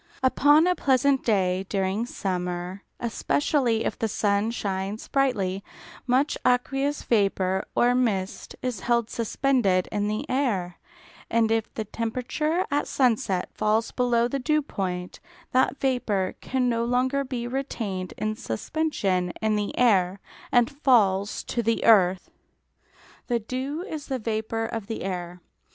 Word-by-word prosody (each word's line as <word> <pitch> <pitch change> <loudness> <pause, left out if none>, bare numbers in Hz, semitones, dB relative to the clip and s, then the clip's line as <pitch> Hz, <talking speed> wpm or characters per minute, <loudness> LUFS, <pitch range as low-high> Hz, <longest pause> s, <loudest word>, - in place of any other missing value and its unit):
Upon 290 +4 +5
a 360 - +3
pleasant 270 -3 +2
day 190 -3 +1
during 195 +3 -1
summer, 180 -2 -3 0.2
especially 235 0 0
if - - -2
the 225 - +1
sun 205 0 +1
shines 200 -2 -3
brightly, 200 -9 0 0.4
much 260 +4 +2
aqueous 270 +3 +1
vapour 195 -4 +1
or 245 +1 +4
mist 215 -7 -1
is 250 -5 -2
held 235 0 0
suspended 230 -5 +1
in 205 0 0
the 215 +1 -2
air, 210 -10 -1 0.5
and 225 -1 +2
if 225 -1 0
the 220 - -3
temperature 255 - -1
at 290 +1 0
sunset 220 -8 +1
falls 220 +2 +1
below 240 -2 +2
the 275 +3 -2
dew 305 +3 +1
point, 180 -8 -4 0.3
that 260 +2 +2
vapour 215 -8 0
can 255 -1 0
no 230 -1 +1
longer 255 +3 +1
be 250 -3 -4
retained 225 -8 -4
in 215 0 -1
suspension 185 - -1
in 220 -1 +1
the 205 -1 -2
air, 195 -6 +3 0.3
and 240 -1 +4
falls 200 -7 +3
to 240 - -2
the 230 0 0
earth. 190 -5 +4 1.0
The 240 - +1
dew 260 +8 -4
is 315 -7 -6
the 265 - -1
vapour 225 0 -2
of 225 -2 -5
the 225 - -4
air. 180 -2 -5
225 Hz, 140 wpm, -26 LUFS, 195-255 Hz, 1.0 s, Upon